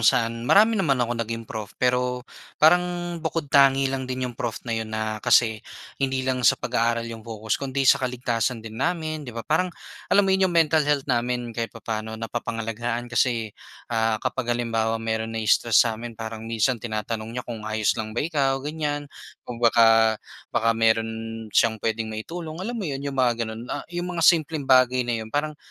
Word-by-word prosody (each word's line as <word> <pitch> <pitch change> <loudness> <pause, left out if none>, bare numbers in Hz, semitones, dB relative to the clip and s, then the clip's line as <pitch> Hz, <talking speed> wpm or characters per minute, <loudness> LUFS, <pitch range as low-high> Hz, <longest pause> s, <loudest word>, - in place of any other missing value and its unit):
saan 115 +1 +2
marami 215 +3 +6
naman 165 - +2
akong 120 -1 -1
naging 115 0 -4
prof, 110 -2 -6
pero 125 0 0 0.3
parang 170 +3 +6 0.4
bukod 160 -2 -3
tangi 135 -1 +5
lang 130 -1 -3
din 130 0 -2
yung 125 - -4
prof 115 -1 -4
na 115 - -3
'yon 110 -1 -2
na 110 -1 -3
kasi 110 -1 +3 0.4
hindi 130 -1 0
lang 130 -1 0
sa - - +4
pag-aaral 115 -1 0
yung 115 - -8
focus 110 +1 -3
kundi 135 0 -1
sa 130 - +5
kaligtasan 125 -2 -1
din 110 +3 -8
namin 160 -1 -1
'di 115 - -9
ba? 115 - -5
Parang 180 +4 +1 0.4
alam 200 0 +4
mo 190 - +2
yung 190 -1 +3
mental 160 -2 +3
health 145 -2 +1
namin 120 -2 -1
kahit 115 0 -3
papa'no 110 0 -4
napapangalagaan 115 +1 -3
kasi, 115 -5 +1 0.4
ah, 110 -1 +2
kapag 130 -2 -2
halimbawa 115 -1 0
mayro'n 110 0 -2
na-i-stress 110 0 +2
sa'min 115 0 -4
parang 110 0 -6
minsan 115 +1 +1
tinatanong 110 +1 -4
niya 125 - -4
kung, 110 -3 -6
"ayos 110 -1 +1
lang 110 +1 -6
ba - - +1
ikaw" 135 -4 0
ganyan, 150 -1 -2 0.4
kung 120 -1 -7
baka 115 -1 +5 0.3
baka 115 -1 +2
mayro'n 115 -1 -1
siyang 110 -1 +3
puwedeng 110 +1 -2
maitulong, 155 +9 -6
alam 200 +7 -4
mo 180 - -3
'yon? 135 0 -4
Yung 140 -1 -4
mga 120 -2 +2
gano'n, 110 +2 -7
ah, - - -4
yung 175 0 -4
mga 170 - -1
simpleng 160 -2 +3
bagay 130 -1 +4
na 120 -1 -2
'yon 110 - -6
parang 150 +1 -1
120 Hz, 185 wpm, -24 LUFS, 115-135 Hz, 0.4 s, marami